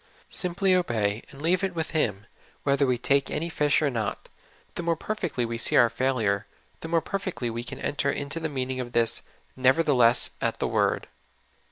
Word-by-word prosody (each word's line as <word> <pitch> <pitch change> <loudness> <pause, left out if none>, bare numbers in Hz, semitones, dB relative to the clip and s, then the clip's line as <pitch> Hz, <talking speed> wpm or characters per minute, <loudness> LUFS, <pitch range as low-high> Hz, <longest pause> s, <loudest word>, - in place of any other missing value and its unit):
Simply 185 +1 +2
obey, 110 - 0
and 135 - -13
leave 180 +4 +2
it 190 -2 -1
with 160 -1 -3
Him, 105 - -1 0.4
whether 140 0 +2
we 125 -1 +1
take 140 +3 +2
any 165 +3 -2
fish 150 -2 +2
or 145 - +2
not. 110 -4 -3 0.4
The - - -4
more 170 -1 +1
perfectly 175 - -2
we 115 0 -4
see - - +3
our 120 -1 +6
failure, 115 -5 0 0.3
the - - -7
more 165 0 +2
perfectly 185 -11 -3
can - - -7
we - - -10
enter 145 -1 0
into 145 +3 -4
the 160 -1 -3
meaning 130 -2 -3
of 120 -1 -5
this 115 -1 +3 0.2
" - - -37
nevertheless 130 -3 +4
at - - 0
the - - -1
word." - - +1
140 Hz, 190 wpm, -26 LUFS, 120-165 Hz, 0.4 s, our